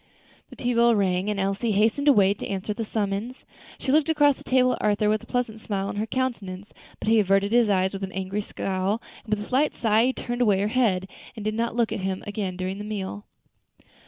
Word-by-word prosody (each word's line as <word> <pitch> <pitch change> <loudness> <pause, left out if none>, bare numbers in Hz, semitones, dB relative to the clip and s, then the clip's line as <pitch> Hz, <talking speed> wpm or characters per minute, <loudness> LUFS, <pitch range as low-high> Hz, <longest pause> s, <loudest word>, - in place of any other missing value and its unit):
The - - -12
tea 245 0 -1
bell 235 0 +4
rang, 190 -1 +1
and 205 -1 -1
Elsie 195 +3 0
hastened 220 +8 +2
away 200 -8 +5
to - - -7
answer 195 +2 -3
the 225 - -4
summons. 210 +3 -3 0.3
She 265 - -2
looked 310 +2 +3
across 295 -3 +4
the - - -13
table 255 -1 +3
at - - -5
Arthur 210 0 +2
with 215 0 +1
a - - -14
pleasant 235 -3 -2
smile 200 -2 -2
on - - -5
her 215 +2 -1
countenance, 210 -7 -3 0.2
but - - -7
he 225 0 +5
averted 195 0 +2
his 235 -2 +4
eyes 190 -1 +2
with 195 - -5
an 190 -1 -4
angry 190 +2 -3
scowl; 195 +1 -2 0.2
and 220 - -11
with 210 0 -6
a - - -14
slight 275 +4 +1
sigh 225 +1 +3
she 260 - +1
turned 240 -1 -4
away 205 -5 +3
her 205 +2 0
head, 210 -7 +1 0.3
and 215 -2 -7
did 215 - 0
not 230 +1 -1
look 235 -2 +1
at - - -2
him 190 0 -3
again 200 -3 -4
during 185 +1 -3
the - - -5
meal. 205 -1 -5
210 Hz, 235 wpm, -25 LUFS, 195-235 Hz, 0.3 s, away